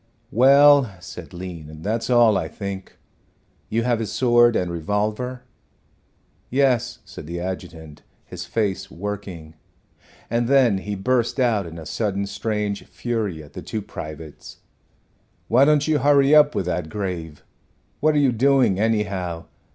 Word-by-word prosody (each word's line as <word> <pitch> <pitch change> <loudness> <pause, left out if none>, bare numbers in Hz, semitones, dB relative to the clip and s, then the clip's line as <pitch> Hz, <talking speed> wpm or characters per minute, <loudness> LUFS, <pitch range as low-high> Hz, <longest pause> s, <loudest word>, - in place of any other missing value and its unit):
"Well," 140 -2 +6
said 85 -1 -10
Lean, 85 -4 -9
"that's 115 +3 -2
all, 120 -3 +5
I 80 - -1
think. 100 +1 -7 0.7
You 115 +2 0
have 120 -1 +1
his 110 - -3
sword 120 -2 +4
and 90 -1 0
revolver?" 105 +8 -2 1.1
"Yes," 125 -2 +1
said 90 -5 -10
the 85 +1 -5
adjutant, 85 -4 -7 0.2
his - - -8
face 100 -3 -2
working, 95 -4 -7 0.7
and 115 +1 0
then 125 -7 +4
he 105 +1 -5
burst 120 +6 0
out 110 -7 +1
in 80 0 -9
a 80 - -9
sudden 100 +3 -2
strange 105 -1 -3
fury 110 -10 -3
at 75 - -16
the - - -7
two 110 -2 -5
privates. 75 -4 -9 0.9
"Why 125 +5 +5
don't 150 0 +3
you 155 -2 +2
hurry 140 +1 +4
up 150 -1 +6
with 95 - -1
that 90 -2 -3
grave? 90 -7 -5 0.6
What 155 +1 +2
are - - +3
you 140 -3 +4
doing, 125 -4 +3
anyhow? 100 -6 -1
105 Hz, 145 wpm, -22 LUFS, 90-125 Hz, 1.1 s, Well